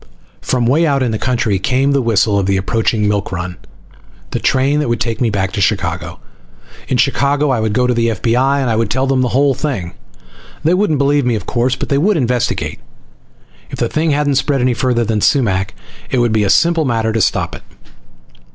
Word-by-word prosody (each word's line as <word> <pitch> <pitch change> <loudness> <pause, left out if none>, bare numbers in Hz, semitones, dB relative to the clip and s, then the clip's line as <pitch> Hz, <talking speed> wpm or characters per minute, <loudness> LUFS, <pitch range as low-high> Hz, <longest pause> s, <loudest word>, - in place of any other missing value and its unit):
From 125 -2 0
way 155 +7 +3
out 140 -2 +1
in 120 - 0
the 110 - -3
country 115 -5 0
came 130 +7 +1
the 140 -1 +2
whistle 105 -3 +2
of 95 - -1
the 100 0 +1
approaching 110 +2 0
milk 100 -1 -1
run, 90 0 -4 0.8
the - - -2
train 135 +3 +1
that 150 - -1
would 120 -1 0
take 115 +2 -2
me 120 - +2
back 95 -3 -1
to 100 - -3
Chicago. 95 - -1 0.7
In 130 - 0
Chicago 140 +3 +1
I 125 - +1
would 110 -1 -1
go 125 +3 +2
to 125 - +1
the 115 0 +1
F.B.I, 125 +6 +1
and 115 -3 0
tell 130 +1 0
them 135 -1 +1
the 125 - +1
whole 140 +3 +2
thing. 125 - -4 0.7
They 165 - +3
wouldn't 180 -5 +1
believe 140 +1 +2
me, 120 - +1
of 100 -4 -5
course, 125 +1 0
but - - -5
they 140 - +2
would 195 +4 +2
investigate. 125 - -1 0.9
If - - -7
the - - -1
thing 160 +1 0
hadn't 145 -2 +1
spread 140 0 -1
any 125 0 +2
farther 120 -1 0
than 110 -1 -1
Sumac 100 -9 +1 0.3
it 130 - -1
would 120 -2 +2
be 110 -1 +2
a - - 0
simple 165 +9 +3
matter 115 -4 0
to 115 - 0
stop - - 0
it. - - -8
125 Hz, 210 wpm, -16 LUFS, 110-140 Hz, 0.9 s, way